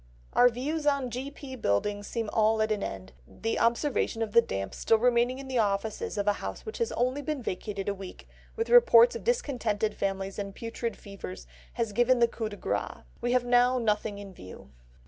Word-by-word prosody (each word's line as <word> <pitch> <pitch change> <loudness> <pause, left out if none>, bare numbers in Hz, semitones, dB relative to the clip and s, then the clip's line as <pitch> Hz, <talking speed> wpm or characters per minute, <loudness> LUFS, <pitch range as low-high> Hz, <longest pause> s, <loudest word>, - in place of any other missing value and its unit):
"Our 245 - +6
views 295 +6 -3
on 280 -4 +1
G.P. 265 +1 -6
Buildings 205 - 0
seem 230 -2 -3
all 220 0 +3
at 215 - -1
an 210 -1 0
end; 95 - -6
the 225 0 -3
observation 235 -1 +1
of 220 - -4
the 235 - +7
damp 95 - -4
still 225 - +2
remaining 245 +2 +2
in 270 0 -8
the 260 -2 0
offices 210 0 -1
of 200 - 0
a 205 - +5
house - - -6
which 435 - -6
has 465 - 0
only 255 +4 0
been 290 -2 -3
vacated 200 0 -4
a 205 - +1
week, 195 -2 -10 0.3
with 455 +1 -2
reports 485 0 +7
of - - -6
discontented 235 - 0
families 195 0 -3
and 200 -1 -5
putrid 230 0 -4
fevers, 190 - -9 0.3
has 225 -3 -2
given 240 +3 +4
the 235 -1 +4
coup 225 -1 -4
de 205 - -9
grace. - - -3 0.2
We 245 +1 0
have 250 -1 +2
now 245 +1 +4
nothing 210 -3 0
in 200 -1 -9
view." 90 - -12
230 Hz, 200 wpm, -28 LUFS, 205-255 Hz, 0.3 s, the